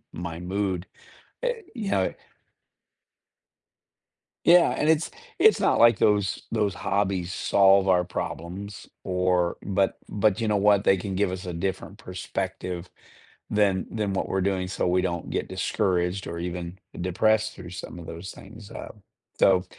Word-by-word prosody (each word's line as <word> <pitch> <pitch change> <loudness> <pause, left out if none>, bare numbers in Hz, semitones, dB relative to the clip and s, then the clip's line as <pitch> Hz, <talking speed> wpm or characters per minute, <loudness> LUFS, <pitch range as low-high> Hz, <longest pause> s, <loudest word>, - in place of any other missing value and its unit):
my 85 -1 -6
mood, 95 0 -2 0.6
uh, - - +3 0.3
you 210 -5 -3
know, 95 - +3
it - - -3 2.3
Yeah, 175 +1 +7
and 150 - 0
it's 160 0 +3 0.3
it's 435 - +6
not - - +3
like 115 -3 +6
those 105 -2 +1
those 105 -4 +1
hobbies 95 -3 -1
solve 95 0 +4
our 90 -1 +4
problems 95 +4 -6 0.2
or 90 -1 +1
but 95 0 0
but 105 0 +1
you 115 - 0
know 105 - +2
what, 100 0 +4
they 95 - +5
can 95 +1 -4
give 95 0 +1
us 95 +1 -5
a 90 - -4
different 95 +3 -4
perspective 90 -2 -5 0.6
than 100 -3 +2
than 105 -3 -1
what 95 - -1
we're 95 - 0
doing 95 -1 0
so 95 - -1
we 90 +1 +2
don't 85 -1 -3
get - - -2
discouraged 90 +1 0
or 85 +1 -5
even 85 +1 -5 0.2
depressed 110 +5 +2
through 90 -2 -10
some 90 -1 -8
of 85 - -9
those 85 +3 -7
things. 105 +1 -13
Um, 105 - -9 0.4
so 90 -1 +5
95 Hz, 155 wpm, -26 LUFS, 90-105 Hz, 2.3 s, Yeah